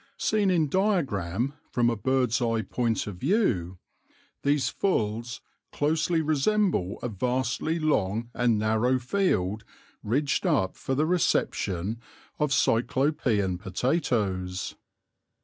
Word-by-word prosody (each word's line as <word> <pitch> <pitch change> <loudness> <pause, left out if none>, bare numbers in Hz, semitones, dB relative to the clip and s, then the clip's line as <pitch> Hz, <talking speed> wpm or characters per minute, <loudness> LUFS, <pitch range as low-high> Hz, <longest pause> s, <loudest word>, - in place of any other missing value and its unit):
Seen 210 -3 +1
in 165 -4 +2
diagram, 135 - 0 0.2
from 120 -1 +2
a - - -1
bird's 125 +1 +1
eye 115 -2 +1
point 115 -3 -1
of 100 -3 -6
view, 105 - 0 0.6
these 145 0 +2
"fulls" 115 - -1 0.3
closely 160 +3 +1
resemble 155 - +1
a - - 0
vastly 125 - -1
long 115 - 0
and 120 -3 +2
narrow 110 +4 +2
field 115 - 0 0.4
ridged 140 - 0
up 135 - +1
for 135 - -3
the 150 +3 +2
reception 115 - 0 0.4
of 150 -2 +1
Cyclopean 115 - +1
potatoes. 95 - -1
125 Hz, 110 wpm, -27 LUFS, 105-155 Hz, 0.6 s, in